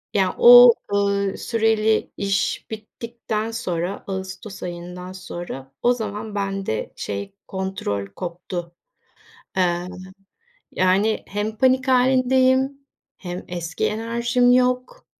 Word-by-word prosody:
ya, 190 -2 +2
o, 245 0 +10 0.2
ııı, 200 -1 +1
süreli 220 -1 +1
iş 200 0 -1
bittikten 220 0 -5
sonra 185 -4 -3
ağustos 195 +1 -6
ayından 180 +1 -7
sonra 175 -7 -8
o 245 +1 +5
zaman 215 -2 -5
bende 195 - -3
şey, 100 - -5
kontrol 190 - -3
koptu. 175 - -6 0.8
Eee, 175 -1 +1 0.8
yani, 195 +4 +2
hem 210 +2 -3
panik 260 +1 +3
hâlindeyim 260 +1 +3 0.4
hem 180 -1 -6
eski 170 -1 -3
enerjim 235 +3 +1
yok. 255 - +1
200 Hz, 100 wpm, -22 LUFS, 180-235 Hz, 0.8 s, o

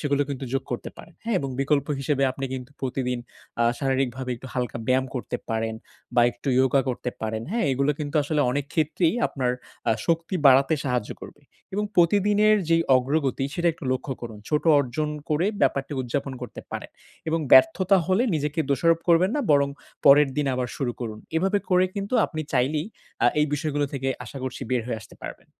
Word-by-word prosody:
সেগুলো 145 -1 +1
কিন্তু 135 -1 -4
যোগ 135 - 0
করতে 120 - -4
পারেন। 170 - -13
হ্যা? 230 - -1
এবং 135 -4 -3
বিকল্প 140 +1 +1
হিসেবে 140 0 0
আপনি 135 +1 -5
কিন্তু 130 +1 -7
প্রতিদিন 125 -1 -2 0.4
আ - - +5 0.2
শারীরিকভাবে 130 -1 -1
একটু 130 - -11
হালকা 125 -2 -2
ব্যায়াম 130 +1 +3
করতে 125 - -3
পারেন, 110 0 -1 0.4
বা 120 - +5
একটু 130 +4 -7
ইয়োগা 130 +1 +4
করতে 125 0 -2
পারেন। 110 0 -3
হ্যাঁ? 235 +2 0
এগুলো 140 +3 +1
কিন্তু 145 0 -5
আসলে 150 +1 0
অনেক 140 +2 -1
ক্ষেত্রেই, 160 +3 +1
আপনার 130 -3 -1 0.4
আ - - +5
শক্তি 165 +2 0
বাড়াতে 135 +4 +6
সাহায্য 125 -5 -1
করবে। 145 - -12 0.3
এবং 210 +1 0
প্রতিদিনের 205 +4 +4
যে 165 - +6 0.2
অগ্রগতি, 135 +1 0
সেটা 175 0 +1
একটু 160 - -12
লক্ষ্য 130 +1 -3
করুন। 110 -3 -7
ছোট 150 -1 +1 0.2
অর্জন 145 +3 -1 0.2
করে, 160 +5 +2
ব্যাপারটি 140 +2 +1
উদযাপন 135 +2 -3
করতে 120 - -7
পারেন। - - -6 0.4
এবং 165 +1 +1
ব্যর্থতা 190 +5 +6
হলে 190 +5 +3
নিজেকে 150 +2 -1
দোষারোপ 165 +4 +3
করবেন 175 +4 +5
না, - - +1
বরং 140 -1 +4 0.4
পরের 140 +1 +8
দিন 145 -1 0
আবার 125 -1 -2
শুরু 125 -4 -1
করুন। 110 -3 -5 0.2
এভাবে 195 +4 +2
করে 180 0 +5
কিন্তু 200 +4 -3
আপনি 155 - -5
চাইলেই, 150 +6 +1 0.4
আ - - +7
এই 150 - +3
বিষয়গুলো 145 -1 -1
থেকে, 135 -1 -2 0.2
আশা 140 - -8
করছি 130 -2 -5
বের 125 -2 +1
হয়ে 115 -3 -3
আসতে - - -14
পারবেন। - - -8
140 Hz, 185 wpm, -25 LUFS, 130-160 Hz, 0.4 s, পরের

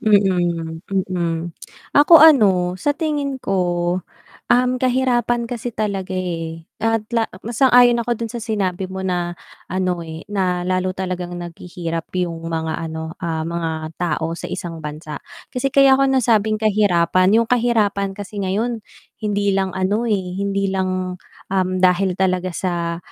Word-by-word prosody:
Mm, 175 -6 +2
mm. 175 -3 -2 0.4
Ako 300 +2 +7
ano 190 - +5
sa 290 +8 0
tingin 290 -3 -1
ko, 195 -1 0 0.9
uhm, 250 +1 +3
kahirapan 245 -2 +1
kasi 240 0 -4
talaga 195 -4 -3
eh, 165 -2 -4 0.2
at 225 -1 +1
la 230 -1 +1 0.2
mas 235 +2 -5
ayon 245 -2 +6
ako 235 -1 -1
dun 230 - -3
sa 235 - -4
sinabi 190 -4 -2
mo 190 0 -5
na 175 -1 -2 0.3
ano 180 -1 -1
eh, 160 0 -8
na 185 -3 -1
lalo 185 0 -1
talagang 180 -1 -4
naghihirap 170 -1 -6
yung 170 -2 -2
mga 165 0 -3
ano, 160 0 -5
ah, 160 -2 -2
mga 170 -1 -2 0.3
tao 165 -1 -1
sa 170 - -6
isang 165 -2 -5
bansa. 150 0 -7 0.3
Kasi 255 +1 0
kaya 275 0 +6
ko 270 0 +3
nasabing 220 -5 +2
kahirapan, 195 -2 +3
yung 230 - +3
kahirapan 215 -5 +1
kasi 205 0 -6
ngayon 220 +4 -1 0.4
hindi 205 -1 0
lang 190 -1 -1
ano 210 +5 0
eh, 195 -3 0
hindi 195 0 -1
lang, 185 -1 -2 0.3
dahil 185 0 +2
talaga 185 -1 +1
sa, 170 -1 -2
190 Hz, 145 wpm, -20 LUFS, 175-225 Hz, 0.9 s, Ako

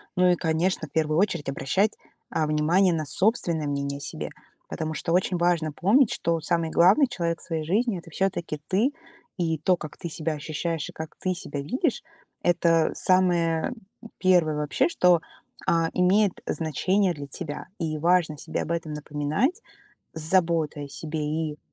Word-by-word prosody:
Ну 180 0 +4
и, 180 - +4
конечно, 160 0 0
первую 155 +2 0
очередь 175 -8 0
обращать, 140 +11 +1 0.4
а, 155 -1 0
внимание 170 +5 +3
на 155 -2 -1
собственное 170 - +1
мнение 140 0 -2
о - - -9
себе. 75 - -5 0.4
Потому 155 0 -3
что 160 +2 -3
очень 180 +1 +2
важно 170 -3 +1
помнить, 220 - +4
что 165 0 0
самый 165 0 0
главный 195 - +5
человек 170 -7 -2
в - - -9
своей 160 -2 -3
жизни- 205 +4 +1
это 165 - -13
всё-таки 170 -4 -2
ты. 215 +9 +2 0.5
И 165 -2 0
то, 180 +4 +3
как 155 -3 -9
ты 170 - -5
себя 160 0 -2
ощущаешь 155 +1 -3
и - - -11
как 160 0 -7
ты 185 -1 0
себя 145 -4 -5
видишь- 255 - -1 0.4
это 165 -2 +3
самое 175 0 +2 0.4
первое 175 -5 +3
вообще, 150 - +1
что, 180 - +4 0.5
а, 165 -1 +2
имеет 190 +2 +3
значение 185 +5 +1
для 145 -3 -8
тебя, 145 +2 -6
и 155 -2 -2
важно 165 -2 +2
себе - - -3
об 170 - -4
этом 165 -2 -2
напоминать 150 - -1 0.5
с 160 - -5
заботой 160 -4 +1
о - - -13
себе 155 +2 -5
и, 155 0 -2
165 Hz, 165 wpm, -26 LUFS, 155-185 Hz, 0.5 s, главный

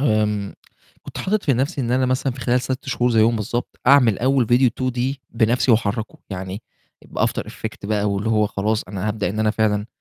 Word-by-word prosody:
آمم 105 -5 0 0.5
كنت - - -9
حاطط 210 +2 0
في 140 - +3
نفْسي 135 +5 -1
إن 120 -2 -2
أنا 130 +1 +2
مثلًا 130 +1 0
في 130 - -10
خلال 125 +1 +1
6 130 +1 -4
شهور 125 -1 +1
زيهم 115 0 +3
بالضبط 115 +3 -4
أعمل 125 -6 +5
أول 130 -2 +2
فيديو 125 +1 +4
D - - -23 0.2
2D 130 +3 -2
بنفْسي 115 +3 +2
وأحركه 110 -1 0
يعني، 95 +2 -5 0.4
بAfter - - -1
Effect - - -7
بقى 105 -1 0
واللي 100 +2 -1
هو 105 -1 +3
خلاص 105 +2 -1
أنا 100 +2 -3
هابدأ 105 -4 -1
إن 105 - -5
أنا 110 0 +2
فعلًا 105 -1 0
115 Hz, 200 wpm, -21 LUFS, 105-130 Hz, 0.5 s, أعمل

